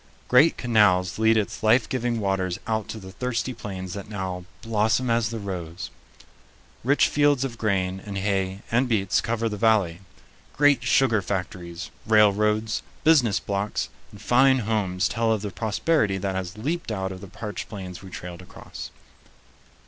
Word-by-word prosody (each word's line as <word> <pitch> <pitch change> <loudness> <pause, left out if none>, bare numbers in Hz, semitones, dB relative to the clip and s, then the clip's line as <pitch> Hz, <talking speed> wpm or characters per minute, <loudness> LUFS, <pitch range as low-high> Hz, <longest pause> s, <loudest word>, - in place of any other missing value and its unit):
Great 130 +7 +5
canals 105 -6 +3
lead 110 0 +4
its 105 -1 -2
life 110 +3 +4
giving 120 -2 -1
waters 95 -3 -1
out 110 -2 -1
to 110 - -6
the 95 -3 -10
thirsty 125 +3 -2
plains 95 -5 -6
that 100 0 -7
now 95 -3 -4 0.2
"blossom 115 +2 +1
as 115 -1 +2
the 115 - -4
rose." 90 -4 -6 0.9
Rich 140 +4 +4
fields 145 -2 +3
of 120 -4 -5
grain 95 -3 0
and 100 -1 -5
hay 95 -1 -1
and 125 +3 +2
beets 100 -5 +2
cover 115 0 -1
the 105 -2 -3
valley. 100 -6 +2 0.6
Great 145 -1 +5
sugar 115 -6 +3
factories, 90 -3 -5 0.2
railroads, 105 +1 +3 0.2
business 135 - +4
blocks, 100 +1 -2 0.2
and 105 - -14
fine 130 +4 +4
homes 100 -3 0
tell 115 0 0
of 110 -2 0
the 105 - -4
prosperity 110 - +1
that 95 0 -2
has 95 +1 -4
leaped 155 +4 -3
out 95 -2 -2
of 95 0 -8
the 100 - -9
parched 105 +2 -6
plains 95 -4 -7
we 95 - -10
trailed 90 +2 -8
across. 90 - -9
105 Hz, 160 wpm, -25 LUFS, 95-115 Hz, 0.9 s, Great